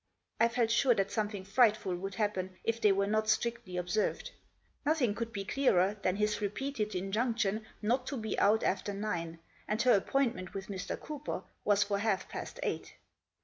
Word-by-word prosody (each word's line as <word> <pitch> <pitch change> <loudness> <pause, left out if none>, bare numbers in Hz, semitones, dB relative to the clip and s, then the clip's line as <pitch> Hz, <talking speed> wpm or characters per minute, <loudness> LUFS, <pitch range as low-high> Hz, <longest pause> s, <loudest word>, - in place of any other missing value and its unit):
I 230 - +6
felt 235 -1 +1
sure 245 +1 +4
that 195 -1 0
something 205 -2 -2
frightful 215 -3 +3
would 195 +2 -5
happen 190 -3 -1
if 230 0 -1
they 210 -2 +6
were 195 +1 +2
not 215 +1 +1
strictly 220 -4 0
observed. 180 +4 -1 0.5
Nothing 285 -8 +2
could 230 +2 -4
be 200 -3 -4
clearer 205 -5 +3
than 185 -1 +1
his 210 +1 0
repeated 215 0 -2
injunction 215 +2 0 0.2
not 250 +4 +1
to 275 - -3
be 220 -1 -2
out 215 +2 +4
after 200 +1 0
nine, 170 -5 -3 0.3
and 210 +1 -1
her 255 - +6
appointment 230 -2 0
with 195 0 -5
Mr. 195 -1 -4
Cooper 300 -1 -5 0.2
was 205 0 +4
for 200 -1 -1
half 200 -3 0
past - - -6
eight. - - -3
210 Hz, 175 wpm, -32 LUFS, 195-230 Hz, 0.5 s, I